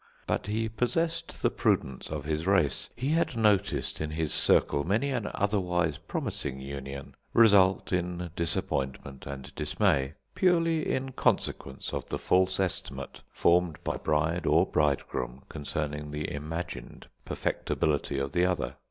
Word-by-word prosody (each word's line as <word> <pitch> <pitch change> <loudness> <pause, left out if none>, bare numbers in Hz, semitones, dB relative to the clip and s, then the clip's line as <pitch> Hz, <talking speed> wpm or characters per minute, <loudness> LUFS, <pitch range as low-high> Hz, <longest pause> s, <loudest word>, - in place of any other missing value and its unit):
But - - -1
he 110 +2 0
possessed 165 +10 -1
the - - +4
prudence 65 -1 0
of 75 -2 -4
his 80 +3 -1
race. 95 -8 +2
He 130 +3 -2
had 160 -6 +1
noticed 100 -6 +2
in 80 - -1
his 80 0 -2
circle 70 - +3
many 110 - +1
an 120 -5 -1
otherwise 90 -6 +1
promising 65 - -3
union 70 0 -7 0.2
result 100 -5 +5
in 90 -1 -1
disappointment 70 -4 -2
and 70 -1 -7
dismay, 70 +1 +1 0.2
purely 165 -3 +2
in 130 0 -1
consequence 70 - -1
of - - -3
the - - -1
false 95 +1 +2
estimate 70 -7 -3
formed 85 -2 +3
by - - -1
bride 80 +3 0
or - - +5
bridegroom 70 -3 -1
concerning 75 0 -3
the 75 +1 -3
imagined 80 +4 -5 0.2
perfectability 75 -2 -1
of 70 0 -2
the 90 +4 +2
other. 90 -10 0
85 Hz, 135 wpm, -29 LUFS, 70-100 Hz, 0.2 s, result